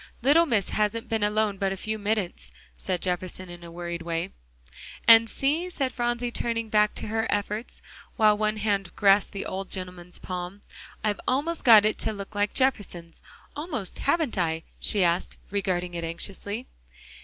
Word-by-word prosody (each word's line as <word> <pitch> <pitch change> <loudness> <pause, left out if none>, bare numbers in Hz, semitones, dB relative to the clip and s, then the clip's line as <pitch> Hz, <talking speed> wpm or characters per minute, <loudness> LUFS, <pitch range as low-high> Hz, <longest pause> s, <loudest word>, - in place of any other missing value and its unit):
"Little 320 +6 +5
Miss 220 -8 +1
hasn't 215 +2 -1
been 225 -2 0
alone 210 -1 +1
but 195 -1 +1
a 195 - -3
few 215 +2 -3
minutes," 200 - -2 0.3
said 180 - -3
Jefferson 185 0 -3
in 175 0 -10
a 170 - -9
worried 170 0 -5
way. 165 0 -3 0.8
"And 230 0 +8
see," 310 +10 0
said 275 -7 -2
Phronsie, 240 0 -1
turning 230 -1 -2
back 210 0 +3
to - - -2
her 225 +1 0
efforts, 210 +3 -3 0.3
while 215 -1 +5
one 215 0 0
hand 200 -3 -1
grasped 200 0 +4
the 200 - -5
old 190 0 -4
gentleman's 180 -1 -5
palm, 180 +2 -6 0.4
"I've 210 -2 0
almost 300 +6 0
got 220 -4 +8
it 215 - +1
to 220 - 0
look 200 0 -8
like 205 0 0
Jefferson's. 195 -10 -1 0.3
Almost, 295 - -4
haven't 285 - +1
I?" 165 -2 0 0.2
she 200 -3 +2
asked, 175 +1 +1 0.2
regarding 180 -3 -1
it 170 -1 -4
anxiously. 200 +7 -3
205 Hz, 165 wpm, -26 LUFS, 180-225 Hz, 0.8 s, And